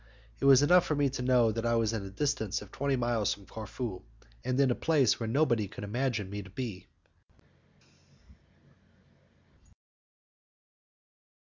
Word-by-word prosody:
It - - -2
was 135 0 +7
enough 175 +4 +5
for 155 - 0
me 140 -2 +1
to 125 - -5
know 125 -3 +3
that 115 +1 -3
I 115 0 +1
was 115 -1 +1
at 110 - -2
a 100 - -7
distance 110 -2 -1
of 105 - -16
twenty 140 0 -1
miles 120 -4 0
from 100 - -17
Corfu, 110 -1 -6 0.4
and 130 +1 -1
in 135 -2 +4
a - - +3
place 140 -5 +2
where 115 -2 -3
nobody 120 -5 +1
could 105 - -9
imagine 115 -1 -2
me 100 +1 -5
to 100 - -12
be. 100 -3 -6
120 Hz, 150 wpm, -30 LUFS, 105-135 Hz, 0.4 s, was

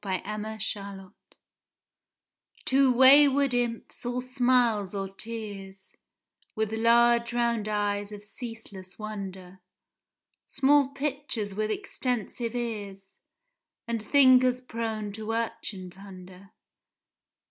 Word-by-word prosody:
THE 190 -2 -1
FOUR 215 +1 -5
SEASONS 200 -2 -5 1.5
Two 270 0 +4
wayward 275 +1 +6
imps, 240 -2 -2
all 245 +1 -2
smiles 245 -6 +1
or 195 -1 -2
tears, 195 -2 -8 0.6
With 220 -1 -1
large 235 +1 +3
round 235 -3 0
eyes 205 -1 -1
of 205 -1 -9
ceaseless 210 -4 -9
wonder, 195 -3 -7 0.9
Small 280 0 +3
pitchers 275 -7 -3
with 215 +2 -2
extensive 245 - -3
ears, 205 -5 -5 0.7
And 230 -1 -2
fingers 255 0 +5
prone 225 -4 -4
to 220 +1 -4
urchin 205 -5 -4
plunder. 190 0 -13
220 Hz, 95 wpm, -27 LUFS, 200-245 Hz, 1.5 s, wayward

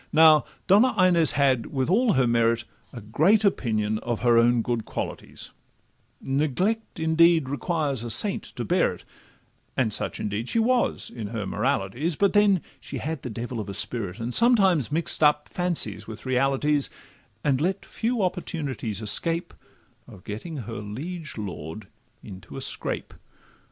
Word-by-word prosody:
Now 155 -1 +6 0.2
Donna 215 +6 +4
Inez 175 -3 +5
had, 135 -5 +2
with 130 -2 -2
all 220 +7 +3
her 130 -2 +3
merit, 115 -1 +2 0.3
A 120 - -9
great 165 - +3
opinion 110 - 0
of 120 -1 -3
her 120 -1 +4
own 115 0 +4
good 120 -1 -2
qualities; - - -6 0.7
Neglect, 155 - -1
indeed, 160 -1 +4
requires 145 -3 -1
a 120 - -5
saint 110 - +3
to - - -7
bear - - +2
it, - - -17 0.7
And 115 -5 +1
such, - - -1
indeed, 105 +4 -3
she - - 0
was 245 +2 +1
in 115 -4 -6
her 110 -2 -4
moralities; 125 - -1
But 200 +3 +2
then 205 -4 +4 0.2
she 140 - -7
had 150 +2 -4
a 125 - -4
devil 120 +1 -5
of 105 -2 -5
a 100 - -5
spirit, 105 -4 -3
And 120 +2 -3
sometimes 195 - +4
mix'd 160 +1 0
up 150 0 +3
fancies 155 - -2
with 110 +1 -9
realities, 135 +3 +1 0.5
And 140 -2 +1
let 185 +4 -1
few 230 -2 -2
opportunities 145 - -3
escape 165 +10 0 0.5
Of 100 -7 -14
getting 150 +10 -6
her 115 -2 -6
liege 140 - -6
lord 95 -1 -7 0.4
into 95 -3 -10
a - - -5
scrape. - - -3
135 Hz, 155 wpm, -25 LUFS, 115-170 Hz, 0.7 s, Now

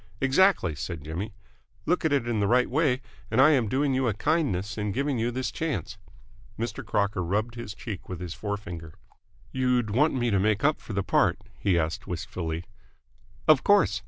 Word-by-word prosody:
"Exactly," 135 - +3
said 75 +1 -5
Jimmy. 90 +8 -5 0.5
"Look 180 +3 +1
at 160 - +2
it 135 -5 +1
in 115 -3 0
the 100 - +2
right 125 +3 +4
way, 135 -3 +2 0.3
and 115 - +1
I 145 +4 +8
am 130 -7 +3
doing 135 +4 +1
you 130 -1 +1
a 110 - 0
kindness 110 - 0
in 105 -1 -2
giving 140 0 0
you 115 +2 +1
this 130 +1 -2
chance." 135 -9 -3 0.6
Mr. 115 +3 -4
Crocker 100 -3 0
rubbed 105 +7 -1
his 120 -4 -7
cheek 105 -4 -7
with 90 -3 -5
his 90 -2 -5
forefinger. 100 -6 -6 0.6
"You'd 125 -4 +1
want 145 +8 +3
me 120 -2 +1
to 100 - +3
make 105 +4 +1
up 150 +1 +2
for 110 - -7
the 100 0 0
part?" 90 -2 +2 0.2
he 95 -4 +2
asked 80 0 -2
wistfully. 85 -1 -4 0.8
"Of 155 -4 +6
course!" 200 - +4
110 Hz, 190 wpm, -27 LUFS, 95-135 Hz, 0.8 s, I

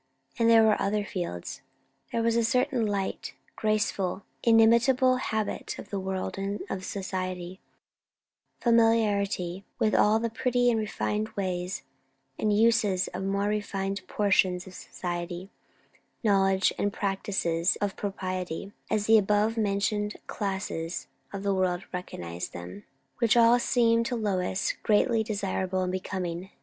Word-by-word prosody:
And 230 0 +4
there 225 -1 +7
were 215 -1 +3
other 205 +1 0
fields. 140 - -5 0.5
There 230 - 0
was 230 0 +2
a 235 - +3
certain 250 0 +1
light, 200 -2 -3 0.2
graceful, 210 -3 0 0.2
inimitable 235 +3 +5
habit 220 -4 -3
of 205 - -10
the 200 - -1
world 190 0 -3
and 200 +1 -2
of 190 - -3
society; 185 -2 -4 1.0
familiarity 205 -6 +2
with 215 - +1
all 210 +1 +4
the 230 0 -2
pretty 245 +1 +2
and 225 - +1
refined 215 0 -2
ways 185 -1 -2 0.6
and 215 - +1
uses 210 -3 +3
of 180 - -6
the 190 - -2
more 200 +1 0
refined 200 -2 -2
portions 190 -3 +2
of 190 - -11
society; 175 +1 -5 0.7
knowledge 195 -2 +3
and 205 - +1
practice 195 0 -2 0.3
of 200 -1 -1
proprieties, 185 -2 -4 0.2
as 215 -1 +1
the 220 0 +7
above 210 +2 +2
mentioned 210 0 0
classes 190 -4 -3 0.3
of 200 -1 -5
the 200 -1 +1
world 185 -1 0
recognize 85 - -5
them; 90 +3 -9 0.3
which 235 -1 +3
all 235 +1 +6
seemed 230 -2 +2
to 250 - -2
Lois 195 -3 0
greatly 225 +2 +3
desirable 190 -3 -1
and 180 - -1
becoming. 185 -1 -4
200 Hz, 135 wpm, -28 LUFS, 185-225 Hz, 1.0 s, there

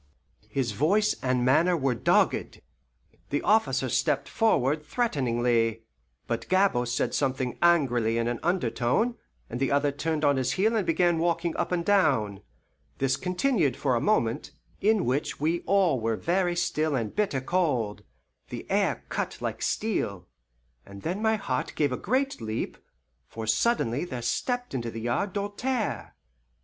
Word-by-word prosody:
His 130 -4 -1
voice 195 - +2
and 130 -1 +1
manner 170 +7 +4
were 135 -4 +1
dogged. 115 - +1 0.7
The 145 - -1
officer 220 +1 +2
stepped - - 0
forward 150 - +1
threateningly; 120 - 0 0.4
but 115 -1 -4
Gabord 185 -11 +3
said 120 - -1
something 130 -2 -1
angrily 125 -10 +3
in 115 0 0
an 120 0 -2
undertone, 170 - +1 0.3
and 120 - -5
the 135 - 0
other 140 0 +2
turned 155 +1 -1
on 145 -1 +3
his 130 -1 0
heel 220 +4 +2
and 210 -5 0
began 170 0 +2
walking 170 0 0
up - - -2
and 170 -1 0
down. 135 - +2 0.6
This 135 0 +1
continued 180 - 0
for 140 -2 0
a 120 - +1
moment, 120 - +1 0.3
in 215 -1 +2
which 130 +4 -1
we 160 +4 +1
all 190 -9 +3
were 115 0 0
very 175 0 0
still 155 -4 0
and 115 -5 -3
bitter 200 -10 0
cold 130 - 0 0.5
the - - -6
air - - +1
cut - - -3
like - - -4
steel 100 - -2 0.6
and 100 0 -12
then 180 +6 -2
my 220 0 +3
heart 210 - -3
gave 145 -3 +1
a - - 0
great 260 - -1
leap, 110 0 -3 0.5
for 110 0 -6
suddenly 120 - +1
there 130 -9 -5
stepped 245 - -2
into 120 -3 -2
the 115 0 -6
yard 120 - -1
Doltaire. 205 - -3
145 Hz, 155 wpm, -27 LUFS, 120-185 Hz, 0.7 s, manner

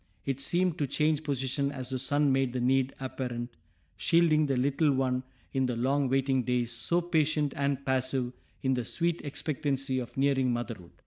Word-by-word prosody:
It 135 -1 -1
seemed 175 +4 +1
to 145 - +1
change 150 +2 +1
position 140 -1 -1
as 130 -2 -5
the 130 - -1
sun 145 +2 +2
made 135 -2 +1
the 130 - -1
need 130 +2 +2
apparent, 125 -4 -4 0.4
shielding 155 - +3
the 135 -2 +1
little 140 +4 +2
one 130 -1 +1 0.3
in 130 -1 +1
the 125 - -1
long 135 +3 +1
waiting 135 0 +2
days, 125 -1 0
so 120 +9 0
patient 155 -4 +1
and 140 -1 -1
passive 130 -1 0 0.3
in 130 0 +2
the 125 -1 -1
sweet 170 +7 -1
expectancy 135 -2 -2
of 125 0 -7
nearing 135 -2 +2
motherhood. 115 -7 -4
135 Hz, 175 wpm, -29 LUFS, 125-145 Hz, 0.4 s, shielding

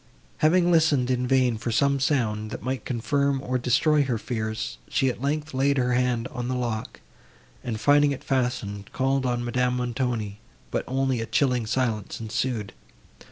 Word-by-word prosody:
Having 175 +3 +4
listened, 150 -6 +3
in 125 0 0
vain, 125 -3 +2
for 120 - -3
some 140 +4 +2
sound, 110 -7 0
that - - -7
might 130 0 -3
confirm, 135 +3 0
or 130 -1 -2
destroy 145 +5 +3
her 125 -3 0
fears, 110 - -4
she, 135 - +2
at 125 - -5
length, 150 +2 -2
laid 140 +2 +2
her 125 -1 +1
hand 125 -1 +1
on 125 -4 -4
the 130 - -1
lock, 120 -3 -3 0.6
and, 110 -3 -3
finding 145 +3 +4
it 140 - -5
fastened, 120 -6 -2
called 135 0 +1
on 120 -1 -1
Madame 125 +1 0
Montoni; 120 -4 -2 0.3
but - - -1
only 130 -2 0
a 115 - -4
chilling 125 -5 +1
silence 110 -4 -1
ensued. 115 -1 -2
125 Hz, 165 wpm, -25 LUFS, 115-135 Hz, 0.6 s, Having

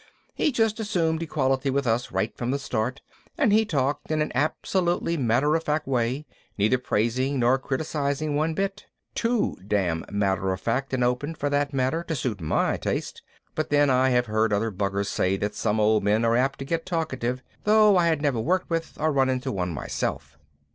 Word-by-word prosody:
He 305 - +1
just 225 -3 +1
assumed 170 -7 0
equality 135 -4 0
with 140 +1 0
us 120 +1 0
right 110 - -1
from 120 - -3
the 135 - +1
start 130 -1 -2 0.4
and 205 - +3
he 220 +1 +4
talked 145 -6 -1
in 155 -1 0
an 150 - 0
absolutely 170 +5 0
matter 135 +2 +2
of 165 - 0
fact 150 0 -1
way, 130 +2 0 0.3
neither 110 +5 +2
praising 125 +4 0
nor 125 +2 +3
criticizing 145 +2 -2
one 155 +2 0
bit 195 +2 -3 0.3
too 235 -1 0
damn 90 -6 0
matter 95 -2 0
of 95 - -5
fact 125 +7 -1
and 125 - 0
open, 125 +6 -1
for 145 -1 -2
that 145 0 +1
matter, 135 +5 0
to 160 - -2
suit 120 -7 -3
my 80 - +1
taste, - - -3 0.3
but 155 - -2
then 145 -1 +4
I 130 +1 +3
have 125 -1 +2
heard 110 0 +1
other 105 +2 0
buggers 100 0 -1
say 95 -1 0
that 105 +1 -2
some 110 0 0
old 105 -1 +3
men 105 +3 +2
are 115 0 +3
apt 135 +3 +1
to 135 - -6
get 165 +3 -1
talkative, 130 -8 -2 0.2
though 210 -1 +6
I 175 -2 +4
had 160 -3 +1
never 140 -6 +1
worked 175 +10 0
with 165 0 -2
or 155 +1 +2
run 135 -2 +2
into 130 -1 -1
one 90 -3 -2
myself. 70 -2 -4
135 Hz, 195 wpm, -25 LUFS, 115-155 Hz, 0.4 s, though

